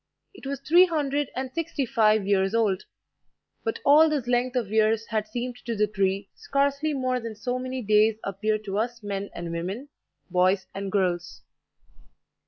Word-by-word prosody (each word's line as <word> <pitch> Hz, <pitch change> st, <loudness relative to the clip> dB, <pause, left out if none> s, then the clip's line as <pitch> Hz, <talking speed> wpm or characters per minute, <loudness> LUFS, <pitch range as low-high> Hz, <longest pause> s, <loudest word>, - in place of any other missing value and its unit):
It 380 Hz, -8 st, -10 dB
was 275 Hz, -1 st, -3 dB
three 345 Hz, +6 st, +6 dB
hundred 290 Hz, -3 st, -1 dB
and 260 Hz, 0 st, -4 dB
sixty 330 Hz, -4 st, -2 dB
five 220 Hz, -5 st, +3 dB
years 195 Hz, +1 st, +2 dB
old; 210 Hz, -5 st, +1 dB, 0.8 s
but 225 Hz, -, -2 dB
all 305 Hz, +3 st, +7 dB
this 290 Hz, -5 st, -1 dB
length 245 Hz, +1 st, 0 dB
of 230 Hz, -5 st, -1 dB
years 220 Hz, 0 st, +2 dB
had 215 Hz, -2 st, -1 dB
seemed 245 Hz, +2 st, -4 dB
to 235 Hz, -, -2 dB
the 210 Hz, 0 st, +3 dB
tree 195 Hz, -1 st, -1 dB
scarcely 280 Hz, +2 st, 0 dB
more 255 Hz, -1 st, 0 dB
than 230 Hz, -2 st, -6 dB
so 245 Hz, +4 st, -3 dB
many 255 Hz, 0 st, -4 dB
days 215 Hz, +1 st, +4 dB
appear 215 Hz, +2 st, -1 dB
to 205 Hz, -1 st, -4 dB
us 235 Hz, 0 st, -3 dB
men 200 Hz, -1 st, -4 dB
and 170 Hz, -1 st, -5 dB
women, 190 Hz, +11 st, -4 dB, 0.4 s
boys 185 Hz, +2 st, +2 dB
and 195 Hz, 0 st, -4 dB
girls. 180 Hz, -3 st, -1 dB
225 Hz, 170 wpm, -26 LUFS, 200-260 Hz, 0.8 s, all